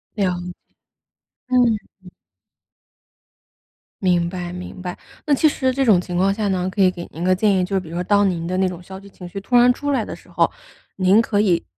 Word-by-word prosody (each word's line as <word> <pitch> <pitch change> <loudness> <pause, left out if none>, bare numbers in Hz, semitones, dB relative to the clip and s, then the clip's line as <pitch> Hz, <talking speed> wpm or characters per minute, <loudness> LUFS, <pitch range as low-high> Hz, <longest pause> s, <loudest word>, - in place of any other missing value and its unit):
了 205 - 0 0.2
解， 180 0 -6 1.0
嗯 245 -3 +3 0.3
嗯。 180 - -12 1.9
明 175 -2 +2
白 175 -1 -5
明 180 +1 -8
白。 180 -1 -5 0.3
那 295 - +2
其 295 +3 +4
实 260 -3 +1
这 270 +1 0
种 205 -7 +5
情 180 -1 -4
况 195 +2 +3
下 210 0 -2
呢， 185 -1 0
可 195 +1 -2
以 185 - +5
给 175 -1 -8
您 165 - -6
个 185 +1 +3
建 200 +2 +2
议， 185 - +2
就 195 +2 -2
是 - - +3
比 175 -4 -10
如 165 - -7
说 180 - -1
当 205 +1 +3
您 170 -2 -3
的 180 +2 -2
那 190 0 +2
种 180 -1 -6
消 190 +1 -9
极 200 0 -14
情 180 -2 -11
绪 195 - -6
突 245 +5 -1
然 245 +1 +7
出 285 +3 -3
来 255 -6 +1
的 - - -7
时 - - -19
候， - - +2 0.5
您 195 +4 +5
可 210 -3 0
以 180 -5 +2
190 Hz, 245 characters per minute, -21 LUFS, 180-215 Hz, 1.9 s, 然